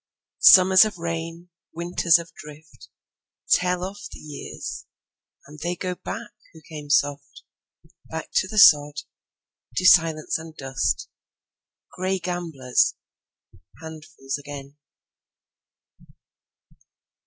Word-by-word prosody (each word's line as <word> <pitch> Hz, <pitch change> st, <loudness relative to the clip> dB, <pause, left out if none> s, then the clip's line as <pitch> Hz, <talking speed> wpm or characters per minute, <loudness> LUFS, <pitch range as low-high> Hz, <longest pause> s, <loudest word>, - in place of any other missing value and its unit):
Summers 190 Hz, -, +8 dB
of 215 Hz, -3 st, -3 dB
rain, 165 Hz, +1 st, -6 dB, 0.3 s
Winters 170 Hz, 0 st, +2 dB
of 165 Hz, -1 st, -10 dB
drift, 150 Hz, +1 st, -14 dB, 0.6 s
Tell 180 Hz, 0 st, +2 dB
off 200 Hz, +2 st, -7 dB
the -, -, -10 dB
years; 150 Hz, -2 st, -8 dB, 0.6 s
And 150 Hz, +2 st, -14 dB
they 175 Hz, +3 st, -3 dB
go 180 Hz, +1 st, -4 dB
backWho 180 Hz, -2 st, -10 dB
came 150 Hz, -2 st, -9 dB
soft—Back 145 Hz, +3 st, -4 dB
to 190 Hz, -, +1 dB
the 215 Hz, +2 st, -7 dB
sod, 150 Hz, -7 st, +6 dB, 0.7 s
To 185 Hz, -, -1 dB
silence 165 Hz, -4 st, +4 dB
and 160 Hz, -1 st, -12 dB
dust; 130 Hz, -, -2 dB, 0.8 s
Gray 185 Hz, +1 st, -2 dB
gamblers, 170 Hz, -8 st, -1 dB, 0.8 s
Handfuls 155 Hz, -3 st, -7 dB
again. 145 Hz, 0 st, -10 dB
160 Hz, 95 wpm, -23 LUFS, 145-180 Hz, 0.8 s, Summers